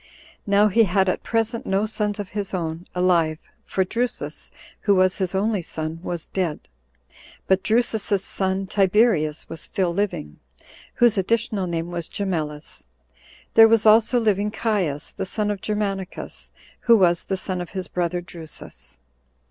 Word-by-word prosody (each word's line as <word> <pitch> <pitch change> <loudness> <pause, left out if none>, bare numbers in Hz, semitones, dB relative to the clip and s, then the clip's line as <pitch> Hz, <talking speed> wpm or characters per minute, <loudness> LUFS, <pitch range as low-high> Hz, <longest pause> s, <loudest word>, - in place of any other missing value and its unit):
Now 200 +1 +5
he 225 +3 +4
had 190 +1 +2
at - - -1
present 230 0 -1
no 195 +2 +1
sons 210 -1 -2
of 200 -2 -5
his 200 -2 -3
own 165 0 -4
alive 170 -3 +2 0.3
for 190 - 0
Drusus, 235 +6 -3 0.3
who 200 -2 +3
was 185 +1 +3
his 190 -1 -1
only 205 0 +1
son, 160 0 -5
was 175 -2 -4
dead; 180 -5 -3 0.8
but 190 0 +2
Drusus's 220 -3 +1
son 190 0 -1
Tiberius 190 -5 +2
was 165 - -2
still 180 -3 -1
living, 170 - -3 0.6
whose 235 -4 +4
additional 215 -1 0
name 170 0 -3
was 170 -2 -4
Gemellus: 155 - -4 0.7
there 225 0 +9
was 225 -1 +3
also 225 +3 +6
living 210 -2 +1
Caius, 200 -10 -1
the - - -5
son 210 +2 -1
of 200 -2 -5
Germanicus, 200 -3 -4 0.3
who 235 -1 +5
was 175 -3 +3
the 190 - -2
son 185 0 -3
24 - - -3
of 175 +2 -9
his 185 -1 -2
brother 175 0 -1
[Drusus]. 160 - -10
190 Hz, 155 wpm, -23 LUFS, 175-210 Hz, 0.8 s, there